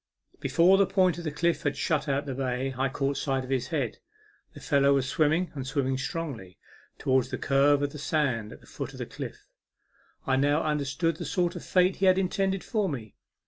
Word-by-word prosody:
Before 170 +8 +4
the 195 - +4
point 185 -3 +2
of 155 -4 -5
cliffs 170 +1 +1
had 145 -4 -1
shut 150 0 0
out 140 +1 0
the 135 - -4
bay, 130 0 -2
I 135 +2 0
caught 140 +1 -1
sight 135 -2 -1
of 130 - -8
his 130 -1 0
head. 135 -6 -2 0.6
The - - -9
fellow 140 -2 +3
was 135 -1 0
swimming, 155 +5 +1
and 135 -3 -5
swimming 135 -2 -1
strongly, 130 - -5 0.4
towards 130 -1 +1
the - - -3
curve 140 +1 +3
of 145 - -1
the 150 - -8
sand 130 -8 0
at - - -12
the - - -18
foot - - -6
of - - -10
the - - -4
cliff. - - -8 0.8
I 130 -1 +2
now 145 +3 +2
understood 150 +2 -1
the 175 - -5
sort 175 +4 0
of - - -7
fate 185 0 +2
he 195 - +2
had 185 0 +5
intended 195 0 0
for 210 -5 0
me. 115 -7 -6
145 Hz, 210 wpm, -28 LUFS, 135-170 Hz, 0.8 s, had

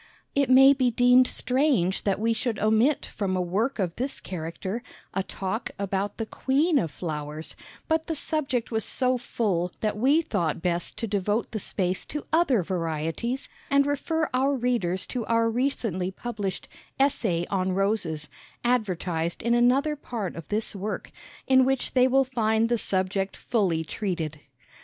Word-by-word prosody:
It 280 -2 +2
may 270 +2 +8
be 260 -3 +2
deemed 245 +2 +5
strange 250 - +1
that 200 -1 +1
we 230 +1 +2
should 225 0 -2
omit 220 +8 +2
from 190 -3 -2
a - - 0
work 210 +10 -1
of 180 -5 -1
this 260 +4 -2
character 185 +5 -5 0.3
a 195 - 0
"Talk" 195 +4 -4
about 200 0 -2
the 225 - -2
Queen 285 +7 +2
of 170 - -1
Flowers, 150 -1 -5 0.3
but 320 0 +1
the 325 - -1
subject 275 -7 -1
was 220 -1 0
so 255 +2 +1
full 185 -7 -1
that 215 -1 0
we 275 +9 +3
thought 170 - -1
best 175 0 -2
to - - -2
devote 205 +2 -1
the 220 - -3
space 185 -1 -1
to 295 - -5
other 280 - +3
varieties 165 - -2 0.2
and 280 0 +4
refer 310 +3 0
our 270 +2 +2
readers 235 -8 0
to 250 -3 -3
our 230 0 +3
recently 225 -7 -1
published 205 -2 -4 0.3
"Essay 210 -11 +2
on 185 -1 0
Roses," 190 -6 0 0.4
advertised 180 -8 -1
in 235 +1 +2
another 260 +5 +3
part 230 - -5
of 165 - -8
this 215 0 -2
work 200 +2 -4 0.3
in 260 0 +5
which 265 0 0
they 255 0 +5
will 270 +1 +4
find 225 -3 +1
the 240 - +2
subject 190 0 -1
fully 185 -8 0
treated. 160 -4 -3
220 Hz, 160 wpm, -26 LUFS, 185-255 Hz, 0.4 s, may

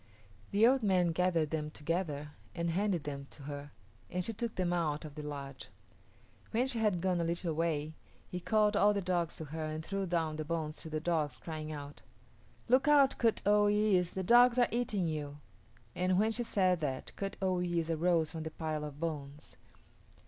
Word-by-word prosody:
The 205 +3 +4
old 260 +2 +5
man 185 -4 +3
gathered 165 -3 +1
them 155 -1 -2
together 150 -2 -3 0.2
and 170 -1 -1
handed 185 -2 0
them 140 -1 -5
to 145 - -13
her, 145 0 -7 0.4
and 180 0 -2
she 225 - -2
took 230 +1 -4
them 180 -1 0
out 155 -3 -1
of 150 - -8
the 150 - -7
lodge. 140 -2 -7 0.8
When 240 +3 +1
she 255 -3 0
had 210 -6 +1
gone 180 -2 +1
a - - +1
little 170 0 -1
way, 155 -1 -1 0.4
she 180 - -3
called 210 +2 +2
all 205 0 +4
the 200 - 0
dogs 175 -2 0
to 160 - -6
her 155 +2 -5
and 155 +1 -4
threw 195 -1 -2
down 165 -3 0
the 155 - -2
bones 155 -1 -3
to 160 - -7
the 155 0 -2
dogs, 155 -4 -1
crying 155 -2 -6
out, 145 -1 -8 0.7
"Look 255 +4 +4
out, 285 -2 +5
Kut 230 -2 +2
o 205 0 +5
yis´, 205 -4 +2
the 190 - -1
dogs 240 +4 +6
are 245 - +4
eating 215 -7 0
you," 145 -2 -4 0.6
and 180 0 +1
when 215 +3 +3
she 230 - -1
said 185 -6 +2
that, 135 -4 -4
Kut 195 -1 -4
o 190 -2 +1
yis´ 170 -2 0
arose 165 -1 +2
from 160 - -5
the 160 - -4
pile 155 -1 -3
of 150 -1 -7
bones. 150 -3 -5
170 Hz, 200 wpm, -33 LUFS, 155-200 Hz, 0.8 s, dogs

